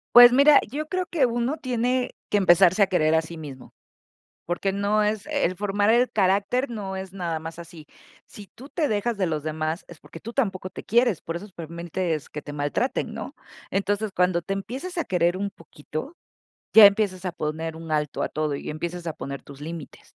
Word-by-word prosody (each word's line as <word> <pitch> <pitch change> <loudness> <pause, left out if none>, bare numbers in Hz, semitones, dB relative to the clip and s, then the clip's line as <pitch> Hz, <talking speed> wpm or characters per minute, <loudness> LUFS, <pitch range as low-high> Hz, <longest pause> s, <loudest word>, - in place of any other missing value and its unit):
Pues 245 0 +11
mira, 280 +3 +7
yo 295 +7 -4
creo 370 +1 -1
que 320 -6 +1
uno 240 +4 0
tiene 250 -1 -1
que 205 - +3
empezarse 185 +1 +5
a 195 - +4
querer 160 -4 +2
a 160 - +4
sí 165 +1 -9
mismo, 140 -5 -10 0.7
porque 175 +3 -1
no 205 +2 +1
es 210 -1 0
el 180 +2 0
formar 205 +1 0
el 240 +2 +4
carácter 200 +6 +1
no 200 -5 -5
es 190 0 -7
nada 170 -4 -2
más 160 +1 -8
así, 170 -2 -11 0.4
si 205 - -12
tú 265 +4 -12
te 310 0 -1
dejas 215 +2 0
de 200 - 0
los 155 -3 -2
demás, 155 +2 -3
es 175 - -13
porque 165 - -12
tú 230 +2 -8
tampoco 195 -8 -1
te - - -10
quieres, 235 -4 +2
por 165 - -4
eso 200 +5 -7
permites 170 -1 -3
que 150 - -7
te 145 - -8
maltraten, 145 - -1
¿no?, - - -7 0.4
entonces, 205 +2 0
cuando 180 -1 +2
te 195 - -4
empiezas 260 - -5
a 335 - 0
querer 175 0 +1
un 200 +1 -1
poquito, 165 - -8 0.6
ya 220 -2 +11
empiezas 200 -2 +1
a 180 - -2
poner 160 +1 -3
un 160 0 -9
alto 150 -2 -1
a - - 0
todo 150 -1 -2
y 140 - -5
empiezas 170 +2 -4
a 160 - -4
poner 140 0 -6
tus 140 -1 -13
límites, 160 0 -9
190 Hz, 205 wpm, -25 LUFS, 165-220 Hz, 0.7 s, Pues